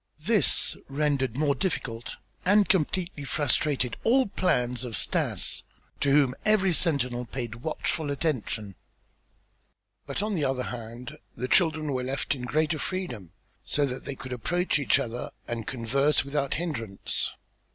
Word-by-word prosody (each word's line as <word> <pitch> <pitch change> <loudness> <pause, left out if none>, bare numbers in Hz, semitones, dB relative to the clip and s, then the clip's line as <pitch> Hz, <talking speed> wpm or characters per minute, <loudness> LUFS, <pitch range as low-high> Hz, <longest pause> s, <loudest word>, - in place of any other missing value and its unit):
This - - +4
rendered 135 -4 0
more 145 -1 +3
difficult 125 - -3 0.3
and 200 +2 +5
completely 180 -3 0
frustrated 140 -2 +1
all 260 +3 +4
plans 125 - 0
of 120 -3 -4
Stas - - 0 0.4
to 145 - +2
whom 140 -3 +5
every 200 -4 +4
sentinel 125 -7 +1
paid 120 -1 -5
watchful 155 0 -1
attention. 125 -8 -2 1.3
But 200 - -2
on 210 0 -1
the 165 -6 0
other 130 -2 0
hand 120 0 -7 0.2
the 125 +2 -3
children 155 -1 +3
were 130 -1 -1
left 135 +2 -1
in 125 -3 -5
greater 155 +3 +1
freedom 120 - -4 0.3
so 145 - +1
that 130 -1 -5
they 140 - -4
could 130 -1 -6
approach 175 +7 0
each 140 - +4
other 120 +1 -3 0.2
and 115 -2 -4
converse 135 +4 +2
without 140 -1 -1
hindrance. 115 - -1
140 Hz, 140 wpm, -28 LUFS, 125-160 Hz, 1.3 s, and